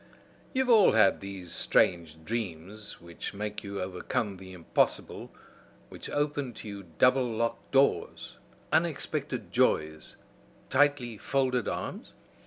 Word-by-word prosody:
"You 260 - +2
have 255 - -5
all 220 -4 +7
had 105 -3 +4
these 95 -3 -8
strange 85 -2 +1
dreams 105 -2 -5
which 85 +2 -8
make 105 +1 -4
you 100 -1 -5
overcome 95 +2 -3
the 95 0 -11
impossible, 90 -3 -1 0.6
which - - -7
open 145 -3 -1
to - - -9
you 100 -3 -8
double 130 +1 +5
locked 115 +1 -2
doors, 135 +1 +1 0.4
unexpected - - -1
joys, 75 0 +1 0.6
tightly 130 -5 +2
folded 130 -3 0
arms? - - -5
105 Hz, 120 wpm, -29 LUFS, 90-130 Hz, 0.6 s, all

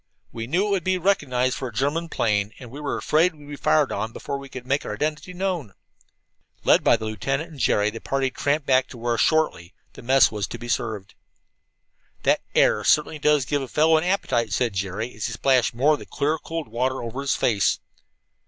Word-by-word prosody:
We 115 0 -6
knew 175 +9 +1
it - - -2
would 195 -4 +1
be 185 +1 +1
recognized 135 -9 +1
for 130 - -4
a - - -7
German 145 +8 -1
plane, 105 -4 0
and 125 -3 -11
we 140 - -8
were 145 - -2
afraid 165 +3 +2
we'd 145 -1 -15
be 145 - -6
fired 150 0 +2
on 110 -1 -3
before 140 - -5
we 140 0 -10
could 130 -2 -8
make 140 +3 0
our 105 - -4
identity 150 +8 -3
known." 180 - -3 0.9
Led - - +4
by - - +5
the 110 - -6
lieutenant 135 +9 -3
and 150 - -11
Jerry, 105 -2 +2
the 115 - -8
party 135 -1 -1
tramped 145 +3 -1
back 130 -1 +3
to 125 - -11
where, 120 0 -1
shortly, 155 - +1 0.2
mess 130 +3 +4
was 105 -2 -3
to - - -7
be 120 - -8
served. 110 -4 -3 1.1
"That - - +3
air 105 - +4
certainly 150 +4 +2
does 150 -2 +3
give 145 +2 -1
a 135 - -5
fellow 155 +5 +3
an 160 - +2
appetite," 155 -11 0
said 120 -4 0
Jerry, 100 +5 -3
as 105 - -3
he - - -5
splashed 130 -3 +2
more 140 +6 +4
of 150 - -2
the - - -11
clear 155 +3 -1
cold 165 0 -5
water 125 +3 -1
over 120 +4 -5
his 140 - 0
face. 100 -6 +2
135 Hz, 215 wpm, -24 LUFS, 115-155 Hz, 1.1 s, by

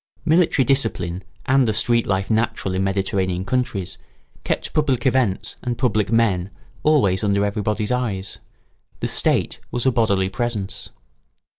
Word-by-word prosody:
Military 160 -4 +3
discipline 95 -10 0 0.2
and 135 -1 +3
the 110 - +1
street 115 +1 +2
life 95 +1 0
natural 110 -4 0
in 95 +1 0
Mediterranean 95 -1 -1
countries, 100 -6 -2 0.4
kept - - -2
public 140 -6 +1
events 125 -7 +1
and 120 -1 -3
public 110 -5 +1
men 100 -5 +2 0.3
always 110 -11 +3
under 100 0 +2
everybody's 105 +1 -1
eyes: 105 -7 -2 0.6
the - - -1
state - - +1
was 120 0 -2
a 130 - +5
bodily 100 -5 +2
presence. 105 -1 -3
105 Hz, 135 wpm, -21 LUFS, 95-125 Hz, 0.6 s, a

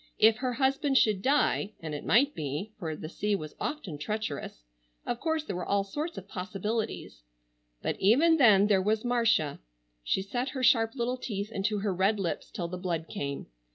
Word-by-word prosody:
If 220 0 +5
her 255 +1 -2
husband 270 +2 +2
should 210 -6 +3
die,—and 210 - 0
it 145 - -5
might 280 +6 +4
be, 150 +8 -4
for 160 -5 -3
the 155 - -7
sea 205 +5 -1
was 155 -5 -6
often 210 - -4
treacherous—of - - -6
course 320 -2 0
there 255 - -5
were 180 - -3
all 200 0 +2
sorts 300 - -5
of 195 - -8
possibilities,—but - - -5
even 290 - +5
then 210 -8 +6
there 200 -2 +3
was 215 +4 0
Marcia! 230 -11 +2 0.4
She 190 - 0
set 245 +7 -2
her 260 -1 -4
sharp 230 -1 +4
little 250 0 -1
teeth 210 -3 -4
into 210 +1 -1
her 200 -2 0
red 195 +4 +2
lips 180 -4 -3
till 180 -6 -4
the 180 +1 -6
blood 170 -3 -2
came. 140 -1 -4
205 Hz, 175 wpm, -29 LUFS, 165-240 Hz, 0.4 s, then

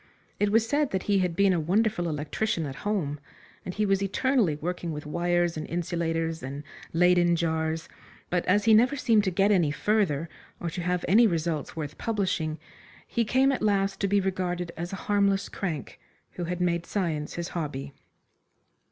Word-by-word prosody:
It 205 0 +2
was 225 +1 +3
said 290 +2 +1
that 190 -1 -2
he 200 -2 +2
had 180 -3 0
been 195 +1 +4
a 175 - +1
wonderful 180 +1 +1
electrician 160 +5 -1
at 135 -1 -6
home, 170 -9 -2 0.4
and - - -4
he 210 - +1
was 195 -1 +2
eternally 205 - +1
working 175 +2 -4
with 150 0 -6
wires 175 +1 0
and 155 - -4
insulators 165 -1 -2
and 140 +3 -6 0.3
Leyden 175 0 +4
jars; 160 -1 -1 0.4
but, 180 -1 +1
as 205 +3 +3
he 225 - +6
never 245 +6 +5
seemed 230 -6 +3
to - - +2
get 195 +3 +2
any 175 -7 +3
further, 170 -3 +1 0.3
or 170 - -3
to 180 - -4
have 180 0 -1
any 225 +6 +6
results 165 -4 -2
worth 150 -2 -6
publishing 185 -8 -1 0.5
he 235 - 0
came 260 +5 +3
at 270 - -2
last 195 -2 +1
to 200 - +1
be 200 +1 +3
regarded 180 -2 -2
as 170 +2 -5
a - - -3
harmless 200 -1 +2
crank, 170 -7 -5 0.3
who 175 - -5
had 180 +1 -3
made 170 -1 0
science 160 -7 -2
his 170 0 -4
hobby. 140 -4 -4
180 Hz, 180 wpm, -27 LUFS, 165-205 Hz, 0.5 s, he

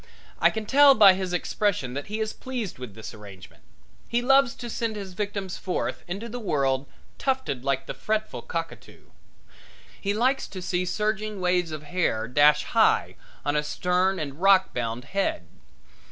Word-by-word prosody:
I - - +5
can 220 -1 -4
tell 280 +4 +7
by 205 -3 +8
his 185 -1 -3
expression 180 -6 -1
that 140 +2 -5
he 215 +2 -4
is 220 0 -2
pleased 240 - -5
with 125 -6 -8
this 110 +1 -8
arrangement. 100 -4 -13 0.5
He 240 +1 0
loves 270 -1 +4
to 240 - -7
send 230 -1 -2
his 195 -3 -7
victims 200 -1 -4
forth 185 - -3
into 195 +6 -5
the 245 +2 -6
world 140 - 0 0.3
tufted 260 - -1
like 135 -1 0
the - - -5
fretful 215 0 -2
cockatoo. 165 -1 -7 0.9
He 200 0 -1
likes 260 +5 +1
to 190 - -8
see 180 0 -1
surging 210 +2 -2
waves 180 -2 +1
of 155 -1 -6
hair 150 -9 -1
dash 145 +4 +4
high - - +2 0.3
on 145 - 0
a 150 - +3
stern 180 +5 0
and 145 0 -5
rockbound 125 -12 +2
head. 190 - -2
185 Hz, 165 wpm, -26 LUFS, 145-215 Hz, 0.9 s, by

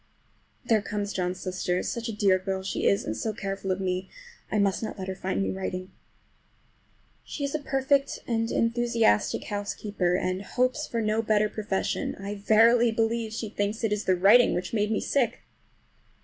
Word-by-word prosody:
There 220 -2 +3
comes 205 0 -3
John's 180 0 -2
sister. 180 -1 -2
Such 235 0 -3
a 215 - -5
dear 195 -3 +4
girl 190 0 -3
as 190 - -7
she - - 0
is, 200 - +2
and 110 - -3
so 220 - -2
careful 195 -1 -4
of 185 - -1
me! 185 0 -2 0.4
I - - +1
must 200 -2 +2
not 220 - -5
let 190 -1 -5
her 190 - -2
find 190 +1 -2
me - - -1
writing. 185 -1 -4 1.3
She 290 - -6
is 280 - -2
a 310 - 0
perfect, 275 0 +1
and 225 -1 0
enthusiastic 230 - +2
housekeeper, 205 -3 -2
and 185 +1 -1
hopes 255 +7 0
for 230 -1 -2
no 215 +1 +1
better 215 -1 +2
profession. 210 -3 -2
I 200 +1 -5
verily 225 +3 +4
believe 225 0 0
she 220 0 -4
thinks 205 +2 -2
it 220 -2 +2
is 210 0 -3
the 185 - +3
writing 205 +7 +6
which 180 +3 -3
made 210 -1 +1
me 220 - 0
sick! 255 -3 0
210 Hz, 185 wpm, -27 LUFS, 190-230 Hz, 1.3 s, writing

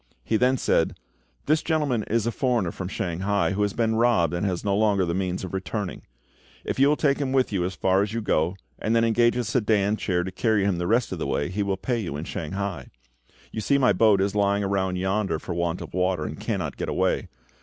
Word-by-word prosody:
He 115 - 0
then 125 +4 +3
said, - - +1 0.5
"This 155 +1 +2
gentleman 150 -8 0
is 115 0 +1
a 115 - 0
foreigner 120 -9 0
from 90 - -6
Shanghai, 95 +3 -1
who 100 +2 -1
has 100 -1 +1
been 115 -1 +1
robbed, 115 -9 +3
and 85 +4 0
has 90 -2 -2
no 100 -1 +2
longer 100 -3 +2
the 85 - -1
means 95 0 -2
of 95 - -6
returning. 95 +1 -4 0.6
If - - -3
you 135 - +6
will 150 - +4
take 145 -2 +1
him 135 -2 -1
with 130 -3 +2
you 95 -3 +1
as 95 +1 -4
far 95 +1 +2
as 100 +1 -1
you 115 - -2
go, 90 -4 0 0.2
and 110 +2 0
then 115 - +4
engage 120 +1 +3
a 125 - 0
sedan 105 -2 +1
chair 90 -4 0
to 95 - -5
carry 110 +2 +1
him 95 -4 0
the 85 - -1
rest 115 +3 +2
of - - -4
the - - -2
way, 70 - -1
he 100 +3 -2
will 100 -1 0
pay 120 +4 -1
you 85 -9 -4
in 75 - -5
Shanghai. 95 +4 -4 0.6
You 110 - -4
see 140 +6 +2
my 130 -2 +4
boat 105 -4 +4
is 100 0 0
lying 100 0 +2
aground 95 -2 0
yonder 95 0 0
for 85 - -6
want 85 0 -1
of - - -9
water, 90 0 0
and - - -6
cannot - - -3
get - - -3
away. - - 0
100 Hz, 240 wpm, -25 LUFS, 95-115 Hz, 0.6 s, you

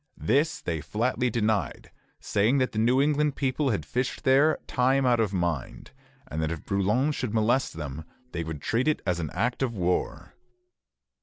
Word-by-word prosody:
This 145 +7 +1
they 80 -3 -2
flatly 120 - 0
denied, 110 - -1 0.3
saying 110 +7 +1
that 130 -1 +1
the 110 - -2
New 120 +4 +3
England 150 0 +2
people 135 +1 0
had 100 - -1
fished 125 +9 -2
there 140 +4 +4
time 130 +2 +2
out 120 -2 +3
of 110 -4 +1
mind, 85 -7 -3 0.4
and 80 - -4
that 80 - 0
if 85 - -6
Brouillan 105 +9 +1
should 125 -6 -3
molest 120 +4 +2
them, 75 -1 -6 0.3
they 85 - -3
would 80 -3 -6
treat 120 +6 0
it 155 - +1
as 90 -3 0
an 80 -3 -3
act 125 +2 -1
of 125 -4 -1
war. 90 -2 -2
115 Hz, 175 wpm, -27 LUFS, 90-130 Hz, 0.4 s, there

